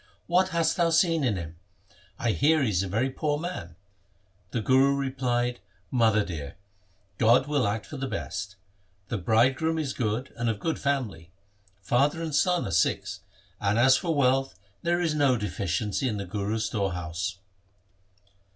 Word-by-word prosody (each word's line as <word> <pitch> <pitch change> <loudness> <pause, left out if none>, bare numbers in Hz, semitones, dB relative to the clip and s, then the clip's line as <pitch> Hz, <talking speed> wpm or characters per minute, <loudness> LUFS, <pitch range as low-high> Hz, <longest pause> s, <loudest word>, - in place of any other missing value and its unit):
' - - -37
What 185 +2 +2
hast 170 -1 +1
thou 170 -2 +3
seen 165 -1 +3
in 120 -6 +1
him? 85 -2 -7 0.6
I 120 - 0
hear 155 +5 +3
he 115 - +1
is 90 -2 +1
a 100 - -2
very 115 +8 0
poor 145 +2 -1
man.' 150 - -6 0.7
The 115 - -2
Guru 130 +5 +4
replied, 125 -3 -1 0.2
' 95 -1 -38
Mother 110 -2 +4
dear, 75 -5 -6 0.6
God 120 +3 +5
will 145 -6 +1
act 105 +1 -2
for 150 - -8
the 135 0 -3
best. 100 -5 -5 0.5
The 110 - -2
bridegroom 130 - +2
is 145 -4 -2
good 115 +1 -2
and 120 0 -1
of 110 -3 -2
good 165 +6 -2
family. 115 -13 -2 0.5
Father 140 +9 +2
and 160 -2 -4
son 180 +3 +2
are 95 - -4
Sikhs, 80 -3 0 0.4
and 105 +1 +1
as 130 +2 +6
for 165 +2 -1
wealth 135 -1 +2 0.3
there 175 +1 +1
is 170 -3 +1
no 140 -4 +3
deficiency 105 +3 -2
in 110 -4 -2
the 100 - -4
Guru's 105 +4 -2
store 100 -5 -1
house.' 85 0 -4
125 Hz, 170 wpm, -27 LUFS, 100-145 Hz, 0.7 s, as